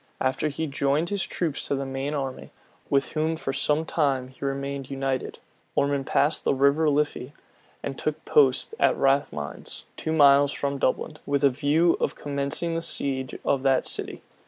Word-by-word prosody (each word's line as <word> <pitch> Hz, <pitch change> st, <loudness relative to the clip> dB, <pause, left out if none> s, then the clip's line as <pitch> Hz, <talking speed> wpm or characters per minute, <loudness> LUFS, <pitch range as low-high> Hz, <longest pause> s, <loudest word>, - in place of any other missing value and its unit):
After 130 Hz, +3 st, 0 dB
he 150 Hz, +2 st, -3 dB
had 155 Hz, -, -3 dB
joined 140 Hz, +5 st, +1 dB
his 200 Hz, -1 st, -1 dB
troops 160 Hz, -5 st, -2 dB
to -, -, 0 dB
the 135 Hz, 0 st, -3 dB
main 135 Hz, +2 st, -3 dB
army, 135 Hz, -2 st, -4 dB, 0.4 s
with 140 Hz, -1 st, +1 dB
whom 160 Hz, +1 st, 0 dB
for 135 Hz, -4 st, -4 dB
some 150 Hz, +3 st, +1 dB
time 135 Hz, -6 st, 0 dB
he 130 Hz, -, -13 dB
remained 140 Hz, 0 st, -3 dB
united, 135 Hz, -1 st, -2 dB, 0.4 s
Ormond 140 Hz, -1 st, +1 dB
passed 145 Hz, +3 st, +2 dB
the -, -, +2 dB
River 140 Hz, +3 st, +3 dB
Liffy, 145 Hz, -2 st, -1 dB, 0.5 s
and 135 Hz, -, -4 dB
took 155 Hz, +1 st, -3 dB
post 135 Hz, -3 st, +3 dB
at -, -, +3 dB
Rathmines, 135 Hz, -, -1 dB
two 160 Hz, -, -3 dB
miles 140 Hz, -2 st, +5 dB
from 140 Hz, -1 st, -2 dB
Dublin, 150 Hz, +4 st, -1 dB
with 140 Hz, 0 st, 0 dB
a 140 Hz, -, +7 dB
view 145 Hz, +6 st, +2 dB
of -, -, -1 dB
commencing 140 Hz, +4 st, -2 dB
the 165 Hz, -, -1 dB
siege 130 Hz, -5 st, 0 dB
of 135 Hz, -, +2 dB
that 135 Hz, -1 st, +2 dB
city. -, -, -3 dB
140 Hz, 175 wpm, -25 LUFS, 135-150 Hz, 0.5 s, a